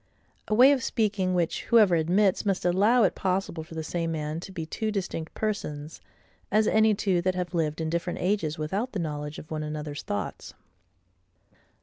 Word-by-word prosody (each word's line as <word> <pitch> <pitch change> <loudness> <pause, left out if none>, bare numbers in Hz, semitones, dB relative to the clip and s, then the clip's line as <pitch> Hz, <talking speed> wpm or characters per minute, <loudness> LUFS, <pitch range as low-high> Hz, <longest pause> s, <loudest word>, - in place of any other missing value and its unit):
A 215 - +1
way 255 +5 +8
of 275 -2 +2
speaking 205 -6 0
which, 170 -2 -1
whoever 215 -6 +5
admits, 185 +4 +2
must 195 -4 -1
allow 205 +7 +4
it 195 - +3
possible 185 -3 -2
for 160 +1 -12
the 160 - -3
same 165 0 -2
man 155 0 -3
to 185 - -9
be 170 -4 -5
two 220 +7 -3
distinct 180 -5 -4
persons, 155 -8 -4 0.5
as 215 +2 +3
any 220 -1 +4
two 190 -3 +1
that 185 +1 0
have 180 -1 -3
lived 160 -2 -1
in 160 - -1
different 170 +1 -2
ages 180 -5 0
without 195 +11 -2
the 200 - -2
knowledge 150 -2 -4
of 155 - -11
one 155 -1 -2
another's 150 -1 -5
thoughts. 100 - -5
180 Hz, 185 wpm, -27 LUFS, 160-205 Hz, 0.5 s, way